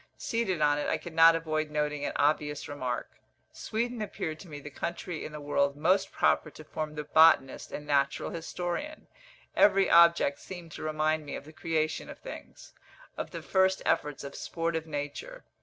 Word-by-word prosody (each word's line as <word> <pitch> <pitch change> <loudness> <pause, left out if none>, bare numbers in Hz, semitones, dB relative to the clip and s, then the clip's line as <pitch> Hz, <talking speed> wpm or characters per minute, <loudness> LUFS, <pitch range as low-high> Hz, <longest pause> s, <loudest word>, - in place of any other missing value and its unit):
Seated 215 -8 -1
on 145 0 +3
it, - - -2
I - - +1
could 175 - -9
not 165 0 +7
avoid 155 -1 -1
noting 150 -1 -1
an - - -2
obvious 150 0 +1
remark. 130 -4 -4 0.4
Sweden 235 +1 -3
appeared 160 -6 -4
to 190 - -11
me 145 -3 -8
the 150 +1 -9
country 170 +2 -4
in - - -6
the 150 - -7
world 140 -1 +1
most 185 +5 +2
proper - - +2
to 155 - -12
form 155 0 -5
the 150 - -3
botanist 150 -3 +4
and 150 - -6
natural 140 -1 +1
historian; 175 - -4 0.5
every 195 -1 +5
object 170 -4 +6
seemed 175 -3 -9
to - - -8
remind 155 0 0
me 145 - -6
of - - -8
the 155 - -13
creation 155 -1 -1
of - - -8
things, - - -11 0.4
of - - -4
the - - -7
first 190 0 +2
efforts 145 -1 0
of 140 - -7
sportive 165 -1 -3
nature. 155 - -5
155 Hz, 180 wpm, -29 LUFS, 150-175 Hz, 0.5 s, not